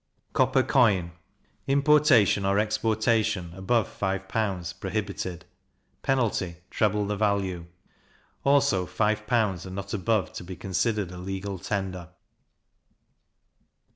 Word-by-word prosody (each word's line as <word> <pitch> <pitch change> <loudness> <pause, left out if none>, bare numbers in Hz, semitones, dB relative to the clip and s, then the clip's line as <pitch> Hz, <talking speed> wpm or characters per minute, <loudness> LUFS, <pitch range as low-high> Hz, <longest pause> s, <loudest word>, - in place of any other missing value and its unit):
Copper - - +3
Coin. 100 -9 +3 0.6
Importation 140 -7 +4
or 100 +1 +2
exportation, 110 -4 +1
above 105 +5 +1
five 95 -1 -3
pounds, 95 -5 -2
prohibited; 95 -3 -4 0.6
penalty, 115 -10 0 0.2
treble 105 -1 +1
the 105 +1 -2
value. 100 -4 -1 0.8
Also 135 -10 +3
five 105 0 0
pounds, 105 -7 +1
and 95 0 -8
not 100 0 -5
above, 110 0 0
to - - -7
be 90 +1 -7
considered 95 +1 -1
a 90 - -8
legal 95 +1 -5
tender. 95 -3 -4
100 Hz, 110 wpm, -26 LUFS, 95-110 Hz, 0.8 s, Importation